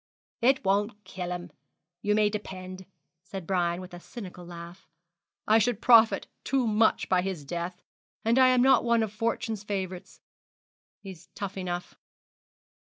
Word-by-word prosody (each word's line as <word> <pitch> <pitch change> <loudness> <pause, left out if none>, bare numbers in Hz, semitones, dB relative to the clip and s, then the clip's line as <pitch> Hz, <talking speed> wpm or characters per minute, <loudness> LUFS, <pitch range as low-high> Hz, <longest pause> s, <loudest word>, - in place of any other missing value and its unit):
'It 265 -1 +3
won't 205 +2 0
kill 185 -2 -6
him, 175 -1 -5 0.5
you 210 0 +1
may 210 -1 +4
depend,' 190 -3 -6 0.3
said 190 0 -8
Brian, 175 -1 0
with 185 -1 -10
a 175 - -8
cynical 180 -3 -9
laugh; 170 +1 -10 0.6
'I 220 +1 +6
should 225 -1 +1
profit 230 -2 +6 0.2
too 270 -2 +1
much 220 0 +2
by 185 -1 +3
his 180 -6 -4
death: 175 +3 -5 0.4
and 230 +3 +4
I'm 255 -1 +6
not 265 -1 +5
one 235 -1 +3
of 215 -2 -4
fortune's 225 -1 -2
favourites. 190 -3 -5 0.8
He's 190 -5 -11
tough 200 -1 -5
enough.' 180 -2 -4
195 Hz, 145 wpm, -28 LUFS, 180-225 Hz, 0.8 s, I